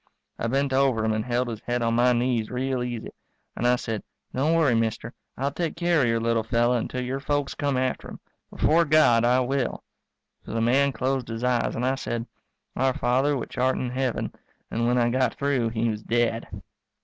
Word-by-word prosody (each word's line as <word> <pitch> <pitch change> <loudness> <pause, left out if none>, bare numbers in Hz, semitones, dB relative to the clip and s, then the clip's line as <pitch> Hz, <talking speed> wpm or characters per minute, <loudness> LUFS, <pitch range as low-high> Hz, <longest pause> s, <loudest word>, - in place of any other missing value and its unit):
I 115 - -1
bent 135 +2 0
over 130 -5 +2
him 110 - +1
and 110 0 -1
held 125 +1 0
his 115 -2 -5
head 120 0 -1
on 115 0 +1
my 120 +2 +4
knees 120 -2 0
real 130 0 -1
easy, 120 -2 -4 0.4
and 120 - 0
I 125 - +5
said, 115 -3 -4 0.3
"Don't 150 +6 +2
worry, 155 -7 +3
mister, 115 0 -1 0.2
I'll 140 +2 -1
take 165 +2 -3
care 170 -2 +2
of 125 - +3
your 115 0 +1
little 115 0 +1
fellow 120 +2 +1
until 125 +2 -2
your 130 +2 -3
folks 145 0 -1
come 140 -2 -1
after 130 0 -1
him. - - -9 0.3
Before 165 +2 +3
God 150 -7 +4
I 125 +2 +4
will." 130 +1 -1 0.6
So - - -8
the - - +1
man 135 +5 +3
closed 130 -1 -1
his 115 +1 -5
eyes 125 -1 +1
and 120 - -1
I 130 - +2
said, 120 -3 -3 0.5
Our 130 0 +1
Father 135 +4 +2
which 125 - -6
art 130 +1 +2
in 125 -1 -2
Heaven, 130 -1 -2 0.4
and 115 +1 0
when 125 +1 +2
I 120 -1 +3
got 130 -1 +1
through 140 -5 0
he 115 +1 -1
was 105 -1 -3
dead. 115 0 0
125 Hz, 210 wpm, -25 LUFS, 115-135 Hz, 0.6 s, I